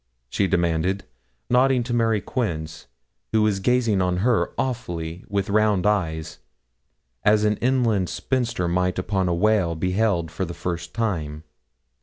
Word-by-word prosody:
she 100 - +1
demanded, 90 +2 0 0.4
nodding 125 0 +3
to 120 +1 -4
Mary 115 -3 +2
Quince, 85 -9 -4 0.5
who 110 -1 +4
was 105 -2 +1
gazing 115 -2 +2
on 90 -1 +1
her 125 -3 +2
awfully, 85 -9 -3
with 100 -1 -1
round 105 -2 +2
eyes, 80 -7 -1 0.8
as 105 0 +4
an 105 0 +2
inland 115 -7 +1
spinster 120 -9 -1
might 90 +1 0
upon 95 0 0
a 85 - +1
whale 95 -3 +2
beheld 90 -1 0
for 85 +4 -3
the 85 -1 -5
first 85 -1 -5
time. 80 -9 -2
95 Hz, 140 wpm, -23 LUFS, 85-110 Hz, 0.8 s, who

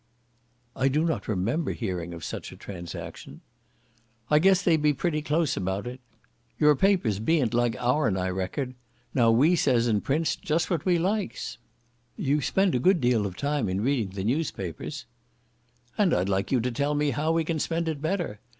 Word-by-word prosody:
"I 130 - +2
do 150 +4 +2
not 160 - -2
remember 110 - -1
hearing 90 -7 -4
of 85 -2 -8
such - - -6
a - - -12
transaction." 85 -4 -8 0.9
"I 150 - +6
guess 190 +2 +4
they 170 -3 +4
be 150 -1 +2
pretty 155 +1 -1
close 150 -2 0
about 95 +2 -2
it. 125 +1 -6 0.6
Your 150 -1 +5
papers 140 - +2
ben't 130 0 +1
like 120 -1 +2
ourn, 125 -5 +1
I 95 0 -1
reckon? 95 +8 -3 0.4
Now 120 -3 +4
we 140 +10 +5
says 125 -7 +2
and 110 -4 +1
prints 150 +2 0
just 170 -2 -1
what 170 - -1
we 180 -2 +3
likes." 190 - -2 0.6
"You 145 +2 +1
spend 190 +4 +2
a 125 - +2
good 185 +6 +4
deal 120 -5 +2
of 90 - -9
time 145 -6 -1
in 95 +2 -1
reading 120 -4 0
the 95 - -3
newspapers." 110 - -3 0.9
"And 195 -5 +4
I'd 95 +2 0
like 95 0 -1
you 130 - +3
to 125 +2 -1
tell 140 +5 0
me 145 0 +1
how 155 +3 0
we 165 0 +2
can 160 0 -2
spend 165 +2 -1
it 155 -3 -3
better. 160 - -2
140 Hz, 185 wpm, -26 LUFS, 110-160 Hz, 0.9 s, I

